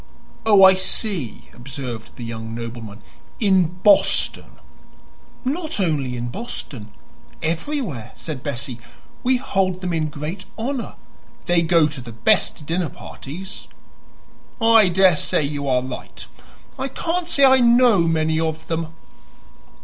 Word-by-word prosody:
"Oh, 205 -3 +7
I 190 0 +9
see," 185 - 0
observed 125 -3 -8
the 120 - -8
young 115 -1 -6
nobleman. 115 -3 -7 0.4
"In 185 -5 +2
Boston." 205 -2 +3 0.9
"Not 310 +1 -2
only 145 -9 0
in 120 0 -3
Boston; 130 - -7 0.5
everywhere," 165 - -3
said 155 -5 -6
Bessie. 135 -3 -4 0.4
"We 255 +1 +2
hold 190 -7 0
them 180 -2 -2
in 155 -2 0
great 155 +6 -6
honor; 245 +2 -3 0.5
they 175 -1 +3
go 165 -2 +4
to 145 -3 -7
the 120 -1 -9
best 115 +6 +1
dinner 170 +1 -1
parties." 185 +11 -9 0.9
"I 225 -4 +6
daresay 180 -4 +3
you 140 0 -3
are 125 -1 +2
right. 130 -1 -8 0.5
I 265 - -1
can't 335 +6 -2
say 280 -4 +5
I 265 0 +6
know 240 -3 +5
many 160 -1 +1
of 160 -1 -2
them." 165 0 -1
165 Hz, 125 wpm, -21 LUFS, 135-205 Hz, 0.9 s, I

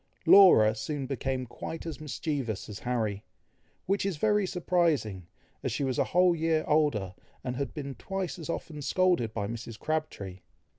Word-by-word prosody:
Laura 145 - +8
soon 135 +5 -4
became 130 0 -2
quite 160 +7 -7
as 155 -3 -6
mischievous 135 - -3
as 105 -1 -7
Harry, 110 -5 -2 0.6
which 195 +2 +1
is 195 -5 -1
very 210 +2 +2
surprising, 165 - 0 0.3
as - - -2
she - - -1
was 130 -2 -1
a - - +3
whole 180 0 +4
year 160 -1 +1
older, 135 -12 +2 0.3
and 125 -1 -3
had 140 +1 -3
been 140 -3 -5
twice 190 +2 -4
as 165 - -7
often 155 -2 -4
scolded 175 -7 +2
by 105 -2 -3
Mrs. 115 +1 -6
Crabtree. 155 -13 -3
145 Hz, 160 wpm, -29 LUFS, 115-165 Hz, 0.6 s, Laura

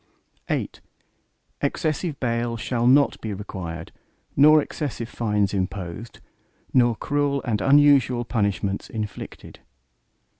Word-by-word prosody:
VIII - - -1 0.9
Excessive 155 +1 -1
bail 115 -1 -1
shall 120 +1 -1
not 140 +3 +4
be 110 -2 -4
required 85 -5 -7 0.4
nor 155 +2 +7
excessive 140 -6 -4
fines 105 -5 0
imposed, 95 +2 -4 0.5
nor 120 -2 +4
cruel 145 +2 0
and 110 -5 -1
unusual 135 -3 +4
punishments 100 -3 -1
inflicted. 105 -2 -7
115 Hz, 100 wpm, -24 LUFS, 105-140 Hz, 0.9 s, nor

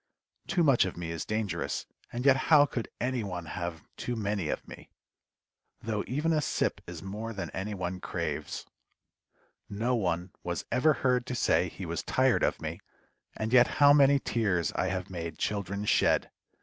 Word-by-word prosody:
Too 175 -3 +2
much 140 -6 +5
of 90 - -5
me 85 -1 -4
is 85 -2 -4
dangerous, 110 -2 -2 0.3
and 120 +2 -4
yet 135 -1 +7
how 145 +2 +5
could 125 -4 -4
any 125 -1 -1
one 90 -4 -5
have 85 0 -5
too 120 - -3
many 100 -6 -1
of - - -3
me? - - -11 0.9
though 110 -2 -2
even 150 +6 0
a 155 - +2
sip - - -1
is 85 -1 -7
more 105 +4 -5
than 100 - -5
any 100 +2 -4
one 90 0 -3
craves. - - -4 1.0
No 115 +5 0
one 90 -5 -1
was 85 -1 -3
ever 130 +6 +4
heard 125 -1 +2
to 125 - -3
say - - +2
he - - -7
was - - -2
tired - - +2
of - - +1
me, - - -5 0.6
and 110 +2 -2
yet 125 -1 +7
how 145 -1 +8
many 140 -1 +6
tears 105 -10 0
I 95 - 0
have 95 -1 -3
made 85 -3 -5
children 100 0 -2
shed! - - +3
105 Hz, 175 wpm, -29 LUFS, 90-125 Hz, 1.0 s, how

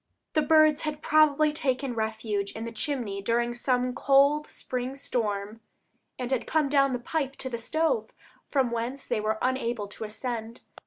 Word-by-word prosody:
The 310 - +3
birds 310 0 +5
had 305 -1 -4
probably 305 -1 +4
taken 265 -3 -1
refuge 220 -2 -2
in 225 - -5
the 230 - -5
chimney 230 -6 -2
during 235 +3 +1
some 250 +1 0
cold 280 +3 +4
spring 255 +1 -4
storm, 215 -4 -3 0.6
and 250 0 -4
had 260 - 0
come 310 -3 +2
down 275 -2 +3
the - - 0
pipe 275 +2 -2
to 260 - -5
the 235 - -3
stove, 320 - 0 0.4
from 265 -4 +1
whence 235 +4 -3
they 215 - 0
were 215 +1 0
unable 240 -4 -1
to 210 - -7
ascend. 225 +1 -5
250 Hz, 165 wpm, -27 LUFS, 230-285 Hz, 0.6 s, birds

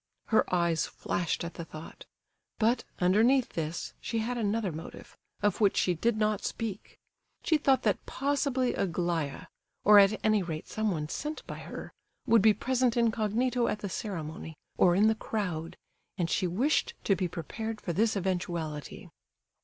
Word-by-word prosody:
Her 220 - +3
eyes 170 -2 +2
flashed 175 -1 -2
at 170 - -5
the 170 - -6
thought. 155 0 -11 0.5
But, 230 +3 +2
underneath 225 +8 +4
this, 165 +1 -4
she 230 - -3
had 230 +3 -1
another 215 -3 0
motive, 160 +2 -9 0.3
of 205 +1 +1
which 200 -2 +4
she 180 - +3
did 220 +6 0
not 215 -1 +1
speak. 215 -4 -5 0.5
She 315 -2 +3
thought 270 -2 +3
that - - 0
possibly 275 -2 0
Aglaya, 170 -6 -1 0.4
or 210 0 +8
at 200 +2 +5
any 215 -1 +4
rate 160 -3 -5
someone 190 -9 -1
sent 300 - -5
by - - -7
her, - - -8 0.3
would 230 -3 +5
be 215 +2 +7
present 250 +3 +1
incognito 235 +2 +1
at - - 0
the 200 - -3
ceremony, 160 -5 -5 0.2
or 175 -1 +4
in 205 +3 +5
the 220 - +4
crowd, 180 -7 -4 0.4
and 170 -3 -1
she 185 - +1
wished 275 - +1
to 195 - +3
be 180 0 -1
prepared 215 +6 -5
for 175 - -3
this 220 +5 +2
eventuality. 175 -6 -3
205 Hz, 160 wpm, -29 LUFS, 175-230 Hz, 0.5 s, or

